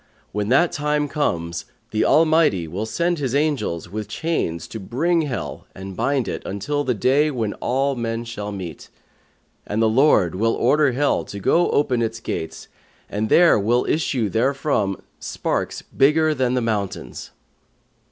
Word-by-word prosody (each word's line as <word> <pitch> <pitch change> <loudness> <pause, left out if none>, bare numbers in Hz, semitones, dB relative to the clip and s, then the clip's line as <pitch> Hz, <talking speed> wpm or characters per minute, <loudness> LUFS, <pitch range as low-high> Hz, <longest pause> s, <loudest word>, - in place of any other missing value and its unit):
When 105 +1 -2
that 150 +7 +4
time 150 -1 0
comes, 85 - -2 0.3
the 110 - +1
Almighty 155 - +3
will 100 +7 -4
send 170 +6 0
His 135 -2 -1
angels 140 - 0
with 105 +3 -5
chains 110 - -2
to 110 - -6
bring 165 - +1
Hell 120 - -5
and 95 0 -8
bind 135 +1 0
it - - -3
until 145 +10 -2
the 125 -3 0
Day 135 +8 +3
when 115 -7 -2
all 135 +2 0
men 115 -1 -3
shall 105 -3 -6
meet; 90 -6 -7 0.7
and 105 - -3
the 115 - +4
Lord 110 - +4
will 115 +5 +1
order 140 +2 +3
Hell 145 +3 +1
to 100 - -7
go 170 - +3
open 130 -5 +1
its 115 0 -2
gates 80 -7 -5 0.4
and 105 +2 -1
there 170 -9 +6
will 120 +5 +2
issue 135 -7 0
therefrom 115 -3 0 0.2
sparks - - -3
bigger 155 +3 +3
than 130 -3 0
the 125 - +1
mountains.' 105 -4 -3
120 Hz, 155 wpm, -22 LUFS, 105-145 Hz, 0.7 s, there